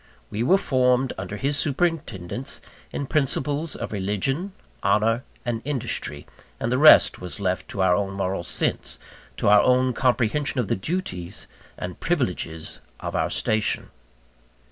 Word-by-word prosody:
We 105 - -2
were 180 +11 +5
formed, 130 -5 +2
under 95 +2 -5
his 140 +5 0
superintendence, 135 - -1 0.3
in 140 - -3
principles 145 +2 0
of - - -5
religion, 110 - -1 0.3
honour, 115 +3 +2 0.2
and 120 -2 -1
industry; 120 - -3 0.3
and 115 - -1
the 130 - +2
rest 155 +1 +7
was 90 +2 -5
left 95 -2 -1
to 95 - -1
our 90 -1 +4
own 95 +1 0
moral 95 -1 -1
sense, 85 - 0 0.4
to - - 0
our 105 0 +7
own 130 0 +3
comprehension 130 +3 +1
of 120 - -1
the - - +2
duties 95 - -4 0.3
and 90 -1 -6
privileges 90 - -2 0.2
of - - -5
our - - +1
station. 110 -1 0
120 Hz, 145 wpm, -24 LUFS, 95-140 Hz, 0.4 s, rest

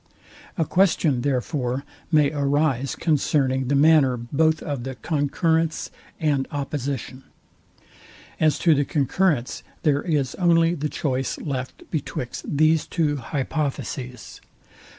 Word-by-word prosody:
A 165 - +1
question, 160 -7 +2
therefore, 130 0 -1 0.3
may 150 -3 +4
arise 140 -2 +1
concerning 135 -4 +1
the 140 - +1
manner 140 -3 +5
both 155 +7 +1
of 140 -5 -4
the 130 0 -5
concurrence 160 +2 0 0.3
and 145 -4 +1
opposition. 140 -2 -4 1.2
As 155 -1 +3
to 165 - +7
the 145 -1 +2
concurrence, 145 -2 0 0.2
there 145 -2 +2
is 145 -6 0
only 170 -1 +4
the 150 -2 -2
choice 135 -3 -2
left 130 -3 -5
betwixt 135 -5 -4
these 155 +2 +2
two 150 -4 0
hypotheses. 130 -2 -4
145 Hz, 110 wpm, -23 LUFS, 130-155 Hz, 1.2 s, to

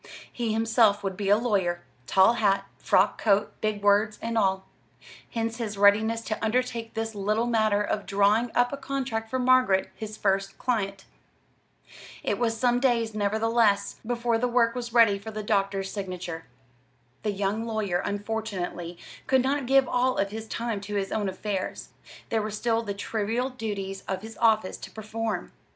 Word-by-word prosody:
He 235 -2 -2
himself 220 -2 +3
would 195 -1 -2
be 195 0 -2
a 205 - +6
lawyer 190 -7 0 0.2
tall 190 +4 +5
hat, 195 -4 +1
frock 190 +3 +2
coat, 205 -1 +2
big 215 -2 -1
words 205 +1 +3
and 230 0 -3
all. 190 -3 +1 0.6
Hence 230 0 -2
his 215 -4 -4
readiness 215 +3 +4
to 220 -1 -4
undertake 230 0 -1
this 225 0 -2
little 210 +3 0
matter 215 -3 +2
of 205 0 -2
drawing 205 +4 +3
up 245 +2 +3
a - - -3
contract 265 -5 -3
for 260 - -1
Margaret, 255 -6 +3
his 215 0 -7
first 195 -1 0
client. 200 -6 -2 1.2
It - - -1
was 230 -2 0
some 245 0 +3
days, 235 -4 +1
nevertheless, 215 0 +1
before 235 0 0
the 250 - +1
work 235 -1 +3
was 240 -1 -5
ready 225 -4 +5
for 215 +3 -8
the 215 -1 -5
doctor's 195 -2 0
signature. 180 -4 -5 0.8
The 210 - -1
young 205 +3 -2
lawyer, 210 -6 -1
unfortunately, 200 -5 -4 0.3
could 260 -1 +3
not 275 -1 0
give 270 0 +4
all 250 +1 +1
of 200 0 0
his 220 +1 -6
time 230 -2 -3
to 205 +1 -5
his 195 -1 -1
own 210 -3 0
affairs; 190 0 -4 0.4
there 225 -1 +1
were 215 - -3
still 225 +2 0
the 205 -3 -4
trivial 225 +5 -2
duties 200 -5 -4
of 190 0 -3
his 225 0 -9
office 220 -4 +2
to - - -9
perform. 220 -3 -4
220 Hz, 170 wpm, -27 LUFS, 200-230 Hz, 1.2 s, a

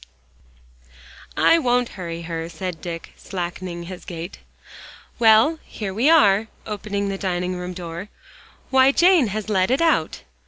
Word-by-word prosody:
"I 335 - +5
won't 245 -4 +1
hurry 170 -3 -6
her," 165 0 -5
said 170 0 -6
Dick, 170 -1 -7
slackening 175 -1 -5
his 180 +1 -9
gait. 170 +1 -7 0.8
"Well, 230 +8 +5
here 200 -3 -6
we 240 +9 +2
are," 215 -9 +5 0.2
opening 205 -1 -3
the 195 0 -4
dining 180 -1 -2
room 180 0 -5
door. 175 +2 -7 0.6
"Why, 265 0 +6
Jane 345 -3 +4
has 210 +1 -4
let 190 -3 +1
it 260 - +2
out!" 320 - +1
195 Hz, 135 wpm, -22 LUFS, 175-230 Hz, 0.8 s, Why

